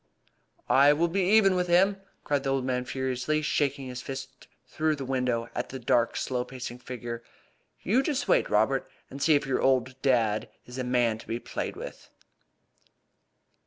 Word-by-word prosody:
"I 140 +2 +6
will 170 +3 +1
be 195 +3 0
even 195 +1 +5
with 180 -1 0
him!" 190 +3 +4 0.3
cried 145 -1 0
the 135 - -2
old 135 -1 0
man 125 -1 -1
furiously, 130 +4 -1
shaking 140 -2 0
his 125 0 -6
fist 135 0 -8 0.2
through 155 0 0
the 140 -2 -6
window 125 -3 -1
at - - -3
the 135 - -6
dark 120 -1 +1
slow 125 -1 -1
pacing 125 -1 -7
figure. 120 -2 -6 0.6
"You 235 +8 +3
just 280 0 -1
wait, - - +3
Robert, 110 +6 +2 0.2
and 140 - -8
see 155 +1 +5
if 145 - +1
your 135 -1 0
old 130 0 +1
dad 115 -6 +2 0.2
is 125 +1 -8
a - - -1
man 120 -3 +1
to - - -13
be 115 - -2
played - - -5
with." - - -9
130 Hz, 175 wpm, -28 LUFS, 125-150 Hz, 0.6 s, I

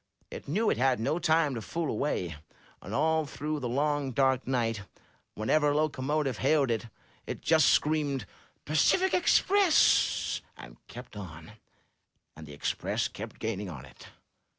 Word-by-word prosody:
It - - -8
knew 210 +10 +1
it - - -1
had 130 -2 +2
no 150 +9 0
time 160 -3 +2
to 115 - -4
fool 165 +8 -3
away, 90 - -2 0.5
and 95 - -9
all 155 +4 +1
through 150 +2 -4
the 125 -3 -3
long, 145 +1 0
dark 130 0 +1
night, 115 -5 0 0.5
whenever 145 +8 +2
a 145 - +1
locomotive 145 -3 -1
hailed 145 -5 +2
it, 115 +1 -2 0.4
it - - -5
just 160 -3 +4
screamed, 145 -6 +1 0.4
Tacific 350 - +2
Express!* 375 0 +3 0.2
and - - -12
kept 120 -2 -11
on. 80 -4 -9 0.8
And 80 0 -11
the 75 - -10
Express 70 - -2
kept - - -8
gaining 105 -3 -4
on 70 -6 -9
it. 65 -3 -15
135 Hz, 150 wpm, -29 LUFS, 110-155 Hz, 0.8 s, just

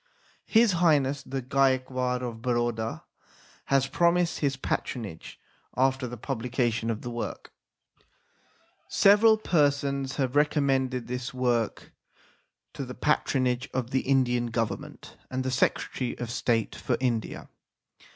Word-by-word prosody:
His 225 -1 +5
Highness 145 -6 +2
the 135 -1 -5
Gaekwar 130 -1 +1
of 115 -2 -5
Baroda 120 -2 -1 0.6
has 135 -1 +2
promised 170 +3 +2
his 140 -2 0
patronage 110 -9 -4 0.4
after 130 0 +2
the 120 0 -7
publication 120 -1 -1
of 115 -1 -3
the 120 - -5
work. 120 0 -5 1.4
Several 215 +2 +5
persons 140 -7 +1
have 130 -2 -1
recommended 135 -4 +1
this 125 +1 -5
work 120 -3 -1 0.8
to 140 - -5
the 125 -1 -7
patronage 130 -3 0
of 125 -1 -2
the 130 - +1
Indian 125 -3 +1
Government 115 -2 -4
and 130 0 -2
the 130 - -2
Secretary 125 0 0
of 120 -1 -5
State 115 -2 0
for - - -1
India. 120 -4 -2
130 Hz, 120 wpm, -27 LUFS, 120-140 Hz, 1.4 s, His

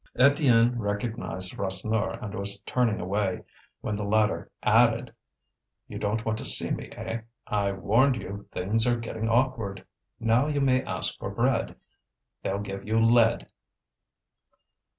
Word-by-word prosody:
Étienne 125 -4 +5
recognized 105 -3 -3
Rasseneur 100 +3 -1
and 105 -1 -5
was 100 -1 0
turning 115 0 0
away, 95 0 -1 0.4
when 105 - -2
the 105 - -3
latter 105 +1 +1
added: - - +3 0.7
"You - - -7
don't 110 +2 -1
want 110 -1 -1
to - - -5
see - - +2
me, - - -3
eh? 115 0 -5 0.2
I 100 -1 0
warned 115 +8 +3
you, 100 +1 -8
things 110 +6 +1
are 120 -1 +2
getting 115 -1 -4
awkward. 115 -5 0 0.3
Now 115 +5 +2
you 145 -1 0
may 130 -2 +2
ask - - -3
for - - -4
bread, - - 0 0.7
they'll 95 - -2
give 100 -1 -6
you 110 +1 +1
lead." 115 0 +4
110 Hz, 140 wpm, -27 LUFS, 100-120 Hz, 0.7 s, Étienne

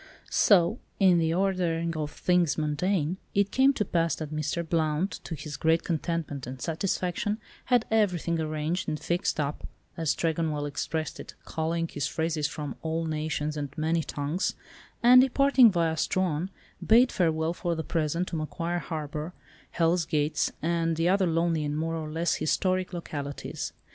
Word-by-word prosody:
So, 195 +2 +4 0.2
in 185 -3 +5
the 160 -1 +1
ordering 175 -3 0
of 150 -1 -2
things 175 -2 +1
mundane, 155 +3 0 0.2
it 200 0 +2
came 265 +1 +5
to 210 - -1
pass 165 -2 +1
that 155 -1 -6
Mr. 155 +2 -2
Blount, 160 +3 0
to 165 - -4
his 145 0 -7
great 160 +1 +2
contentment 160 -5 -2
and 130 +1 -7
satisfaction, 180 - -1 0.3
had 245 -3 +3
everything 180 -6 +1
arranged 155 +3 -2
and 155 - -2
"fixed 175 -2 -1
up," 145 0 -2 0.3
as 160 -3 0
Tregonwell 160 -3 -1
expressed 155 +2 -3
it - - -9
(culling 165 +1 -1
his 145 -4 -3
phrases 160 -1 -1
from 150 -3 -6
all 165 +1 -2
nations 155 -1 -2
and 145 -2 -3
many 160 +2 +1
tongues), 150 +4 -2 0.5
and 250 +1 +9
departing 265 -2 +5
via 165 -3 +1
Strahan, 175 +1 0 0.3
bade 240 +3 +5
farewell 160 -2 +1
for 175 -1 -2
the 160 - -3
present 165 +3 -1
to - - -4
Macquarie 170 +2 -2
Harbour, 155 0 -5 0.3
Hell's 165 0 +1
Gates, 150 -1 0
and 165 0 +1
the 165 +2 +1
other 190 0 +3
lonely 165 -1 +1
and 150 0 -2
more 165 +1 -1
or 155 -1 -4
less 165 +2 +1
historic 185 +4 0
localities. 145 -5 -5
165 Hz, 160 wpm, -28 LUFS, 155-180 Hz, 0.5 s, and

